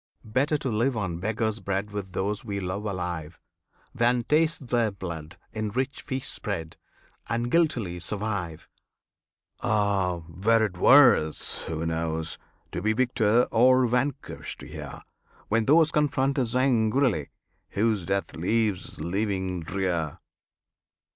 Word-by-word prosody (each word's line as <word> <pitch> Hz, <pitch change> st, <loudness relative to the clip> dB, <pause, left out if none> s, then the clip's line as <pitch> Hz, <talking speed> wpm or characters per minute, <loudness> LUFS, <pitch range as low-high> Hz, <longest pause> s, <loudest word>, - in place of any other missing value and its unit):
Better 135 Hz, +8 st, +1 dB
to 135 Hz, -3 st, -3 dB
live 120 Hz, +3 st, +1 dB
on 90 Hz, -5 st, -2 dB
beggar's 110 Hz, +2 st, -1 dB
bread 100 Hz, +1 st, -2 dB
With 100 Hz, -2 st, -5 dB
those 100 Hz, +3 st, -2 dB
we 100 Hz, -3 st, -3 dB
love 95 Hz, +3 st, -4 dB
alive, 90 Hz, -5 st, -4 dB, 0.5 s
Than 120 Hz, 0 st, +2 dB
taste 155 Hz, -1 st, +1 dB
their 120 Hz, -2 st, +2 dB
blood 85 Hz, -5 st, -7 dB, 0.2 s
in 110 Hz, -1 st, -2 dB
rich 130 Hz, +5 st, -2 dB
feasts 130 Hz, -2 st, -4 dB
spread, 80 Hz, 0 st, -4 dB, 0.5 s
And 120 Hz, +2 st, -1 dB
guiltily 120 Hz, -, +1 dB
survive! 90 Hz, -4 st, -3 dB, 0.9 s
Ah! 100 Hz, -6 st, +1 dB
were 110 Hz, +6 st, +2 dB
it 95 Hz, -4 st, -5 dB
worse 120 Hz, -, +5 dB
who 80 Hz, 0 st, -3 dB
knows? 80 Hz, -1 st, -2 dB, 0.3 s
to 90 Hz, -, -3 dB
be 110 Hz, +3 st, +2 dB
Victor 120 Hz, -1 st, +3 dB
or 130 Hz, +2 st, +5 dB
vanquished 125 Hz, +3 st, -2 dB
here, -, -, -8 dB, 0.5 s
When 115 Hz, +1 st, +2 dB
those 155 Hz, +4 st, +5 dB
confront 140 Hz, -2 st, +1 dB
us 125 Hz, -2 st, -1 dB
angrily 120 Hz, -, +2 dB, 0.4 s
Whose 105 Hz, -2 st, +1 dB
death 100 Hz, 0 st, -1 dB
leaves 105 Hz, +3 st, -1 dB
living 95 Hz, +1 st, -1 dB
drear? 85 Hz, -3 st, -2 dB
105 Hz, 125 wpm, -26 LUFS, 90-125 Hz, 0.9 s, worse